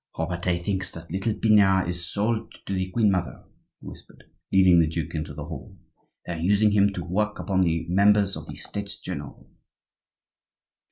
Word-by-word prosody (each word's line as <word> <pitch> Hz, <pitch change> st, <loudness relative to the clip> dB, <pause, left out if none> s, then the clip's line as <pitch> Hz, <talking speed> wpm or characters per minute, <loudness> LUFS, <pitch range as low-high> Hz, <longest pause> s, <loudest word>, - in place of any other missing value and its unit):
"Robertet 85 Hz, +1 st, -2 dB
thinks 95 Hz, -2 st, -2 dB
that 85 Hz, -1 st, -11 dB
little 95 Hz, +4 st, -1 dB
Pinard 100 Hz, -5 st, +4 dB
is 85 Hz, 0 st, -4 dB
sold 110 Hz, +2 st, -1 dB
to 100 Hz, -, -3 dB
the 95 Hz, -1 st, -2 dB
queen 105 Hz, +1 st, +2 dB
mother," 90 Hz, -2 st, -3 dB, 0.4 s
he -, -, -16 dB
whispered, -, -, -13 dB, 0.3 s
leading 95 Hz, -2 st, +6 dB
the 80 Hz, -, +4 dB
duke 80 Hz, 0 st, -4 dB
into 75 Hz, -3 st, -4 dB
the 75 Hz, -, -6 dB
hall; -, -, -9 dB, 0.5 s
"they 85 Hz, -, -4 dB
are 85 Hz, -, -5 dB
using 105 Hz, +5 st, +3 dB
him 100 Hz, -1 st, +4 dB
to 90 Hz, -, -4 dB
work 105 Hz, +4 st, -1 dB
upon 95 Hz, -2 st, 0 dB
the 85 Hz, -2 st, +1 dB
members 100 Hz, +2 st, +3 dB
of -, -, -8 dB
the -, -, -8 dB
States 100 Hz, 0 st, -6 dB
general." 75 Hz, -6 st, -7 dB
95 Hz, 175 wpm, -25 LUFS, 85-100 Hz, 0.5 s, leading